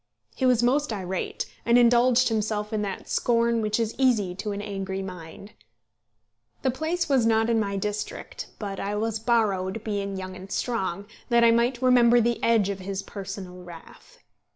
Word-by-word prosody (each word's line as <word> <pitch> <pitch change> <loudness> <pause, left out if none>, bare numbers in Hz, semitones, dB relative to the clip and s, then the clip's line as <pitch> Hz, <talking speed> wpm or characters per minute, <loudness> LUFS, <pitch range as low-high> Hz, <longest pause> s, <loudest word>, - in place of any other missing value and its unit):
He 260 - +1
was 245 -2 +3
most 280 +3 +2
irate, 190 -3 -3 0.2
and 235 +1 +4
indulged 245 +1 +4
himself 215 -1 -2
in 215 - 0
that 200 -2 -5
scorn 235 -1 +1
which 215 +1 0
is 225 -1 0
so - - -15
easy 225 -9 +2
to 205 +3 -4
an 200 - -4
angry 195 -2 -4
mind. 180 +2 -9 1.1
The 260 - +2
place 325 +6 -2
was 270 -4 +3
not 225 0 +2
in 225 - +2
my 200 -2 -1
district, 210 +1 -5
but 200 -2 -5
I 200 +1 -2
was 220 +1 -1
borrowed, 210 -3 0
being 200 -2 -3
young 185 0 -6
and 190 +1 -11
strong, 200 -6 -2 0.2
that 235 -1 +4
I 230 - +7
might 240 +2 +1
remember 245 -1 +5
the 235 0 0
edge 225 -4 +3
of 195 -1 -3
his 195 +1 -4
personal 195 -2 -8
wrath. 175 - -14
215 Hz, 175 wpm, -25 LUFS, 195-235 Hz, 1.1 s, I